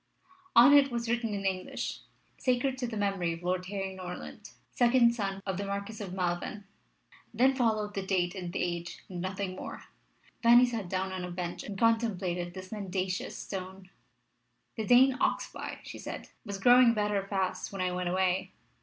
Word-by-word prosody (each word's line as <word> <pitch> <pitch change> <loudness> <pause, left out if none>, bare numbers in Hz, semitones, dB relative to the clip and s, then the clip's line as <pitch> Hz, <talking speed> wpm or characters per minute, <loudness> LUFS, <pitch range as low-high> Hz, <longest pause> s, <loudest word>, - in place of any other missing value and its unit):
On 245 +5 +9
it 280 -1 +7
was 235 -1 -3
written 235 -1 0
in 195 -1 -4
English, 185 -1 -2 0.4
"Sacred 255 +1 +1
to 250 - -1
the 225 -2 -5
Memory 195 -4 0
of 165 +1 -9
Lord 180 0 -1
Harry 195 -1 -3
Norland, 180 -1 -8 0.2
second 240 -1 +4
son 195 -4 -3
of 190 -2 -2
the 200 - -2
Marquis 200 +2 -4
of 195 - -6
Malven." 180 +2 -2 0.7
Then 260 +2 +4
followed 220 -5 0
the 195 - -2
date 185 -2 0
and 180 -3 -5
the - - -1
age, 175 0 -4
and 180 -2 -5
nothing 185 0 -3
more. - - -7 0.6
Fanny 240 +1 +7
sat 225 -7 -4
down 190 +1 -1
on 185 -1 -4
a 180 - -4
bench 175 -1 -4
and 200 -2 -6
contemplated 190 -6 +1
this 185 0 -8
mendacious 190 -3 -3
stone. 190 -1 -7 0.8
"The 220 -3 -3
Dane 255 +1 +6
Oxbye," - - -2
she - - -9
said, - - -7
"was 200 -3 -5
growing 245 +3 +6
better 210 -1 +1
fast 190 -2 -2
when 195 -1 -4
I 180 - 0
went 180 0 -2
away. 185 0 0
195 Hz, 175 wpm, -30 LUFS, 185-230 Hz, 0.8 s, On